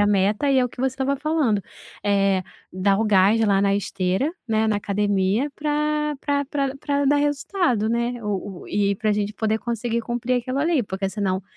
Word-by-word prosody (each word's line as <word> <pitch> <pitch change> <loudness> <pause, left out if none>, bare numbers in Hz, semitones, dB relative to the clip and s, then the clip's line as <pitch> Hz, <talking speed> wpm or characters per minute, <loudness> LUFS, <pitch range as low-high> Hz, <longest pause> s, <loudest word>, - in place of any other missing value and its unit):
a - - +2
meta 205 +6 +2
e 275 - +3
é - - +3
o - - -2
que - - -18
você 265 - +2
estava 270 +1 0
falando, 285 -8 +1 0.4
eh, 195 -2 +2 0.3
dar 195 +2 +2
o - - +2
gás 205 +1 +4
lá 200 -2 +3
na 200 0 +2
esteira, 195 - -1
né, 220 -1 +1
na 215 - +2
academia 205 +5 0
para 300 0 0
para 285 -1 0
para 275 -1 -2
para 285 0 -1
dar 285 +1 +4
resultado, 290 - 0
né, 235 +1 -1
o 200 -2 -4
o - - -12
e 200 -1 +1
para 215 +2 -1
gente 205 0 -1
poder 220 0 0
conseguir 235 0 -2
cumprir 240 +2 -2
aquilo, 255 +3 -3
ali 310 -6 +2
porque 195 0 -3
senão, 195 -2 -1
225 Hz, 195 wpm, -23 LUFS, 200-275 Hz, 0.4 s, gás